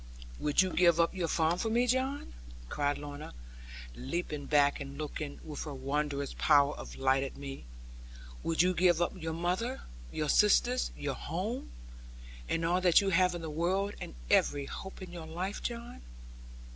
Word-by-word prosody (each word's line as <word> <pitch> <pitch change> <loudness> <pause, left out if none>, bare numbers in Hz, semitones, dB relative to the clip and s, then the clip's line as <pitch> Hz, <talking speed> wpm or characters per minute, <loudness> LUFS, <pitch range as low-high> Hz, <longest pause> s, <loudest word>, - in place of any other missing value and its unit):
'Would 150 +5 +3
you 185 - -2
give 170 -2 +5
up 170 - +3
your 180 -3 -1
farm 165 +2 +1
for 225 - 0
me, 235 +2 +3
John?' 260 +3 -1 0.4
cried 145 0 0
Lorna, 145 - -8 0.6
leaping 145 - -4
back 145 -1 +4
and 140 -1 -7
looking, 150 -1 -5
with 150 0 -6
her 150 -2 -5
wondrous 140 +1 -2
power 145 -1 +5
of - - -9
light 135 0 +2
at 135 - -5
me; 140 - -7 0.8
'would 165 +1 +2
you 185 +1 +3
give 175 -2 +4
up 175 - +1
your 160 -3 -4
mother, 180 +10 -1 0.3
your - - -2
sisters, - - +4
your - - -2
home, - - -4 0.8
and 165 0 0
all 175 +2 +2
that 180 -3 +6
you 195 - +1
have 180 0 +3
in 170 - -6
the 160 - -4
world 190 +6 0
and - - -7 0.2
every 145 -1 +3
hope 190 +7 -8
of 185 - -8
your 165 -2 -7
life, 185 +5 -4
John?' 235 0 -5
165 Hz, 170 wpm, -31 LUFS, 145-185 Hz, 0.8 s, that